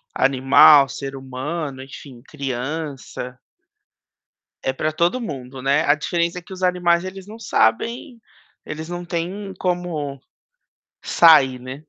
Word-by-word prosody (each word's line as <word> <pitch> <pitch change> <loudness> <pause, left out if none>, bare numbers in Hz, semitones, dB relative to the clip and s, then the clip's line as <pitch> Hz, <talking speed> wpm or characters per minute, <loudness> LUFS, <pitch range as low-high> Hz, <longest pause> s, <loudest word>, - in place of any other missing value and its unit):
animal, 135 +1 +6
ser 135 0 -6
humano 135 +2 -5
enfim, 135 -2 -12
criança 135 -2 -5 1.3
é 130 - +1
pra 155 +3 -2
todo 170 +9 +1
mundo, 135 - -7
né, 140 +4 +2
a 145 - +5
diferença 170 +3 -2
é - - -15
que 180 +3 -12
os 185 - -8
animais, 180 -1 +2
eles 190 +1 -8
não 220 +2 -10
sabem, 230 - 0 0.5
eles 155 +1 -6
não 175 0 -5
têm 185 +3 -4
como 170 -6 -3 0.8
sair, 140 -7 +5
né. 130 +1 -7
155 Hz, 125 wpm, -21 LUFS, 135-175 Hz, 1.3 s, animal